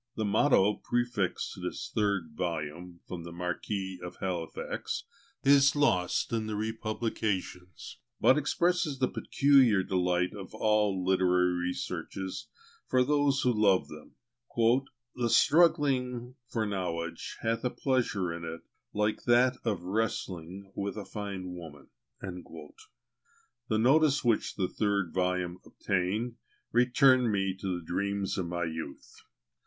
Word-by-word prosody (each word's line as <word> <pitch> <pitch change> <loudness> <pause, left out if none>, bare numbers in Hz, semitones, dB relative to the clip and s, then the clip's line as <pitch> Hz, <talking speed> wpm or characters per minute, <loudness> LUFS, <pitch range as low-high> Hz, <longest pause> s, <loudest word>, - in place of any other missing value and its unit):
The 110 - -1
motto 105 -1 +3
prefixed 120 -6 -1
to - - -11
this - - -5
third 100 -6 0
volume 85 +1 -4
from 90 -2 -6
the 85 0 -8
Marquis 90 +2 -3
of 90 - -7
Halifax 85 -4 -4 0.4
is 140 0 +6
lost 95 -10 +1
in 110 -1 -1
the 110 - -3
republications, 110 -4 -3 0.2
but 130 - +6
expresses 165 0 +1
the 130 -1 +2
peculiar 130 -10 +4
delight 90 -1 0
of 100 +1 -9
all 105 -4 +1
literary 90 -1 +3
researches 95 +5 -4 0.4
for 130 0 +3
those 145 0 +2
who 125 - +2
love 100 -4 +3
them: 75 0 -12 0.4
"The 120 0 0
struggling 135 -6 +3
for 115 -2 -1
knowledge 85 -5 -4
hath 115 0 0
a 125 - +1
pleasure 115 -11 0
in 85 0 -7
it 80 0 -6 0.3
like 105 +1 0
that 125 +1 +4
of 105 -6 -1
wrestling 95 -2 -3
with 100 +1 -3
a 105 - -5
fine 100 -3 -5
woman." 80 -5 -10 0.3
The 335 - -9
notice 140 +5 +4
which 115 -3 +1
the 95 -3 0
third 100 -5 -1
volume 90 -1 -1
obtained, 105 +5 -2 0.3
returned 125 0 +4
me 95 -2 0
to 95 -2 -1
the 85 - -10
dream 100 +3 -1
of 95 -4 -2
my 85 0 -2
youth. 80 -4 -7
100 Hz, 125 wpm, -30 LUFS, 90-120 Hz, 0.4 s, is